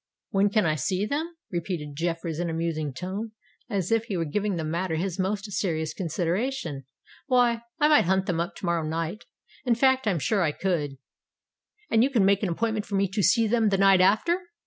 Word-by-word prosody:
"When 200 0 +3
can 210 -1 +2
I 155 - +2
see 185 +7 -1
them?" 315 +8 -3 0.2
repeated 170 -5 -4
Jeffreys 165 0 -2
in 175 -1 -1
a - - -3
musing 160 -3 -2
tone, 190 - -5 0.4
as 195 -3 -2
if 225 0 +2
he 205 -6 -3
were 165 - 0
giving 205 +6 -1
the 165 - -3
matter 165 +2 -2
his 180 +3 -2
most 200 +2 -2
serious 160 -5 -1
consideration: 175 - -2 0.4
"why—I 245 +3 +2
might 300 -8 +5
hunt 190 +1 +2
them 175 -3 -1
up 170 +3 -2
to - - -7
morrow 170 -1 +1
night—in 165 - -4
fact, 260 0 +3
I'm 190 -5 +2
sure 200 +6 +1
I 155 -4 +1
could——" 150 -8 -2 0.9
"And 225 +1 +5
you 265 - +3
can 230 -8 +3
make 200 0 +3
an 200 - 0
appointment 220 +4 -1
for 200 - -3
me 195 0 +2
to 195 +2 -1
see 200 +5 +4
them 220 0 +2
the 195 - +1
night 195 -1 +5
after?" 220 - +3
190 Hz, 200 wpm, -26 LUFS, 165-220 Hz, 0.9 s, might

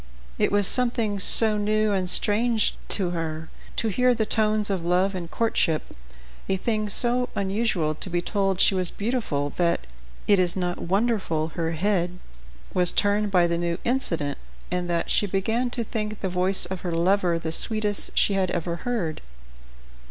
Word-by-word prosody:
It - - +2
was 205 0 +2
something 235 -3 +2
so 215 +2 +4
new 215 +1 +1
and 185 -2 0
strange 220 +3 +3
to 185 -4 0
her 160 -2 -4 0.2
to 225 - 0
hear 250 +4 +2
the 220 -1 0
tones 215 -1 +1
of 185 -3 -2
love 180 +3 +1
and 175 -3 -5
courtship, 175 -8 -1 0.5
a 195 - +2
thing 215 +1 -1
so 245 +4 0
unusual 195 -5 0
to 155 - -7
be 175 0 0
told 195 +1 -1
she - - +5
was 185 -2 -1
beautiful, 200 - -2
that 170 - +1 0.4
it 205 -2 +4
is 180 -1 +7
not 180 -2 -2
wonderful 190 -5 0
her 165 0 -3
head 180 0 0 0.6
was 180 -1 +5
turned 205 +1 +1
by 180 -3 +3
the 170 0 -1
new 170 -1 -1
incident, 165 - -1 0.3
and 180 -1 -2
that 170 -1 -1
she 205 - +2
began 220 +6 -1
to 240 -1 -3
think 215 -1 -4
the 190 - -1
voice 185 +2 0
of 190 -1 -6
her 175 - -3
lover 175 0 +2
the 165 -1 -4
sweetest 210 +3 -1
she 205 - +3
had 190 -2 0
ever 170 0 -2
heard. 190 -9 -3
195 Hz, 170 wpm, -24 LUFS, 175-215 Hz, 0.6 s, is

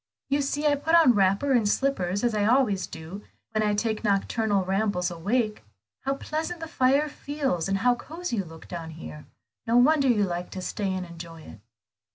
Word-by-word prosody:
You 285 +1 +2
see 285 +2 -2
I 295 - +5
put 315 +4 +1
on 320 -7 +7
wrapper 200 +6 +2
and 230 -5 +3
slippers 200 -7 0
as 240 -2 +2
I 210 -1 +1
always 220 -5 +2
do, 165 +5 -8 0.3
when 215 -1 0
I 210 -1 +1
take 220 +1 -1
nocturnal 205 -1 +1
rambles 190 -2 0
awake. 210 - -1 0.4
How 275 0 +1
pleasant 320 +5 -4
the 325 - -5
fire 280 -1 +2
feels, 280 - -2
and 195 - +1
how 245 +5 +3
cosy 315 +2 -5
you 195 - 0
look 160 -2 -12
here; 160 -2 -8 0.4
no 230 +1 +3
wonder 280 +2 +5
you 225 -5 +3
like 175 -2 -3
to - - -3
stay 195 +1 -2
and 185 -1 -3
enjoy 165 -1 -10
it." 115 - -12
215 Hz, 190 wpm, -26 LUFS, 185-275 Hz, 0.4 s, on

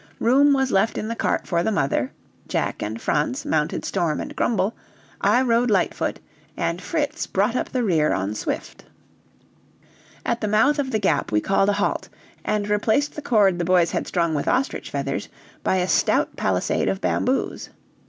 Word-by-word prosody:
Room 275 +5 +4
was 265 -2 +2
left 195 +4 +2
in 215 - -3
the 230 - -2
cart - - -1
for 170 -2 0
the 220 - 0
mother. 135 - 0 0.4
Jack - - -2
and 110 +2 -4
Franz 145 -2 -1
mounted 150 -1 0
Storm 170 -5 0
and - - -6
Grumble, 220 -1 +1 0.5
I 220 +6 +4
rode 240 0 +2
Lightfoot, 195 -4 0 0.4
and 170 +1 -1
Fritz 300 +1 -2
brought 205 +5 +1
up - - -1
the 250 -2 -1
rear 160 -7 +2
on 95 +2 -1
Swift. 110 - -5 1.4
At 235 - -1
the 215 - 0
mouth 265 +9 +3
of 275 -2 -1
the 220 - 0
Gap 175 -9 0
we 105 - +3
called 195 - +2
a - - +3
halt, - - -1 0.3
and 210 -1 -1
replaced 220 +7 +1
the 300 - -5
cord 200 -9 +3
the - - 0
boys 175 -1 +3
had - - -2
strung 170 -3 0
with 145 - -2
ostrich 265 +2 0
feathers - - -3 0.3
by - - +2
a 180 -1 +1
stout - - +2
palisade - - 0
of 195 - -1
bamboos. 260 +6 -1
205 Hz, 180 wpm, -23 LUFS, 170-240 Hz, 1.4 s, Room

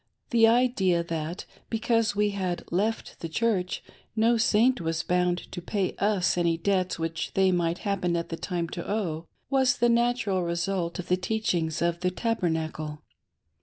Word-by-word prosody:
The 230 -2 +6
idea 225 -8 +3
that, 165 +2 -4 0.2
because 225 -1 +1
we 210 0 +2
had 185 -3 -2
left 210 +6 -1
the 165 - -5
Church, 185 -1 0 0.3
no 230 +2 +4
Saint 230 +3 +3
was 165 0 -1
bound 180 0 +1
to 175 - -5
pay 190 +1 -1
us 195 -3 +2
any 170 -1 +2
debts 185 +1 0
which 165 0 -3
they 190 -1 +4
might 175 -1 +1
hap 200 -2 0
pen 175 -1 +1
at 170 0 -2
the 165 - -3
time 170 0 -3
to 170 - -6
owe, 170 -6 -2 0.2
was 265 -2 +3
the 240 0 +3
natural 235 -5 +2
result 170 0 -1
of 180 - -6
the 180 - +2
teachings 185 -5 -1
of 170 0 0
the 180 +1 +1
Tabernacle. 160 -7 -2
185 Hz, 165 wpm, -27 LUFS, 170-220 Hz, 0.3 s, The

